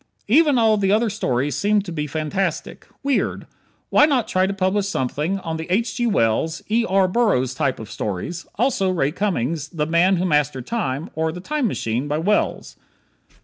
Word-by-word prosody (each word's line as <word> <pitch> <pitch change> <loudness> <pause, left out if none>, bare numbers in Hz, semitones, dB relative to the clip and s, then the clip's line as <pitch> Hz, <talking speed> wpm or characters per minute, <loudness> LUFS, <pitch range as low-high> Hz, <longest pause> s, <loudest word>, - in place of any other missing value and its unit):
Even 290 +4 +4
all 220 -2 +4
the 195 -1 +1
other 220 +1 +2
stories 135 - -1
seem 205 0 +2
to 185 - -7
be 150 -2 -3
fantastic. 155 +6 -3 0.2
Weird. 275 -2 0 0.5
Why 295 - +6
not 265 -6 +1
try 185 0 +1
to - - -1
publish 195 +1 0
something 150 +3 -1
on 165 -2 -4
the 160 - -6
H. 225 +6 0
G. 240 -1 +1
Wells, 160 - +1
E. 230 +2 +3
R. 190 0 +3
Burroughs 180 - +1
type 130 0 -1
of 110 -2 -9
stories, 110 - -4
also 215 -4 +1
Ray 165 -6 +1
Cummings' 165 - -1
"The 155 -4 -2
Man 170 +4 +3
who 180 - 0
Mastered 150 -6 +1
Time," 155 - -3
or 160 0 -1
"The 175 - -7
Time 290 +6 -1
Machine," 120 - -2
by 150 +1 -1
Wells? 205 +6 -1
180 Hz, 185 wpm, -21 LUFS, 150-210 Hz, 0.5 s, Why